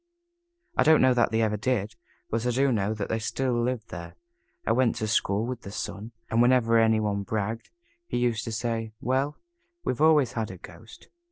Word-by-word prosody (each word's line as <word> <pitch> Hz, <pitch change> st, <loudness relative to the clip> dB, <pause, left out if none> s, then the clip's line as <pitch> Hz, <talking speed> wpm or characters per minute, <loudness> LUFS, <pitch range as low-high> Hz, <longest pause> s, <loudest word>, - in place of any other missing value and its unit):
I -, -, +3 dB
don't 155 Hz, -2 st, +6 dB
know 130 Hz, -1 st, +5 dB
that 120 Hz, -1 st, +3 dB
they 115 Hz, 0 st, +1 dB
ever 105 Hz, -1 st, 0 dB
did, 110 Hz, -2 st, -1 dB, 0.4 s
but 115 Hz, +2 st, 0 dB
I -, -, +2 dB
do 135 Hz, +3 st, +2 dB
know 105 Hz, -1 st, 0 dB
that 105 Hz, -2 st, -3 dB
they 115 Hz, -, -1 dB
still 130 Hz, +3 st, -1 dB
live 120 Hz, -1 st, -1 dB
there. 85 Hz, -1 st, -8 dB, 0.5 s
I -, -, +1 dB
went 130 Hz, -3 st, +2 dB
to 110 Hz, -, -2 dB
school 105 Hz, 0 st, +1 dB
with 125 Hz, 0 st, -5 dB
the 100 Hz, -, -9 dB
son, 105 Hz, +2 st, -6 dB, 0.2 s
and 115 Hz, +1 st, +2 dB
whenever 120 Hz, -2 st, +4 dB
any 110 Hz, -1 st, +4 dB
one 105 Hz, -2 st, -1 dB
bragged, 110 Hz, +2 st, -3 dB, 0.4 s
he -, -, -2 dB
used 120 Hz, -3 st, 0 dB
to 115 Hz, -, -4 dB
say, 115 Hz, -1 st, -3 dB
"Well, 135 Hz, +4 st, 0 dB, 0.5 s
we've 125 Hz, -, -2 dB
always 155 Hz, -5 st, +5 dB
had 110 Hz, -2 st, -3 dB
a 95 Hz, -, -8 dB
ghost. 85 Hz, +6 st, -14 dB
115 Hz, 200 wpm, -27 LUFS, 110-125 Hz, 0.5 s, don't